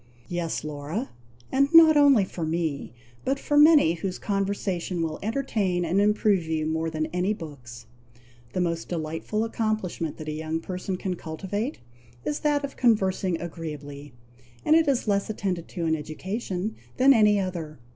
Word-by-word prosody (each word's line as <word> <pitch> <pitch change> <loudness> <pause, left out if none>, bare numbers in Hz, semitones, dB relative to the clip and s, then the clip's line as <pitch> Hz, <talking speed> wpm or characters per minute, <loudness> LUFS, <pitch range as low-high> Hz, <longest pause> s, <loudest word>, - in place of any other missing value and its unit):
"Yes, 175 -2 -2
Laura! 155 - -4 0.4
and 275 +1 +3
not 320 -1 +9
only 280 -8 +6
for 175 -2 -6
me, 160 -3 -2 0.3
but 270 +2 0
for 290 - -2
many 295 - +7
whose 180 +2 -4
conversation 195 -3 -2
will 155 -1 -3
entertain 210 -6 -1
and 180 +4 +2
improve 210 -3 +2
you 160 -1 -1
more 160 +1 -1
than 155 -1 -2
any 185 +4 +1
books. 125 - -10 0.7
The 185 - 0
most 170 -1 -2
delightful 165 +6 -2
accomplishment 215 -8 -2
that 155 - -8
a - - -2
young 160 +1 -3
person 185 +2 -4
can 180 -1 -3
cultivate, 200 - -4 0.4
is 150 -1 -1
that 295 -1 +1
of 275 - -9
conversing 190 -6 +2
agreeably; 145 -5 -7 0.5
and 310 - +5
it 325 -1 +4
is 265 -5 +1
less 200 0 +1
attended 185 -5 -3
to 170 -3 -4
in 160 0 +2
education 185 +6 -4 0.2
than 270 +2 +7
any 210 -3 +4
other. 170 -5 -4
180 Hz, 155 wpm, -26 LUFS, 160-215 Hz, 0.7 s, not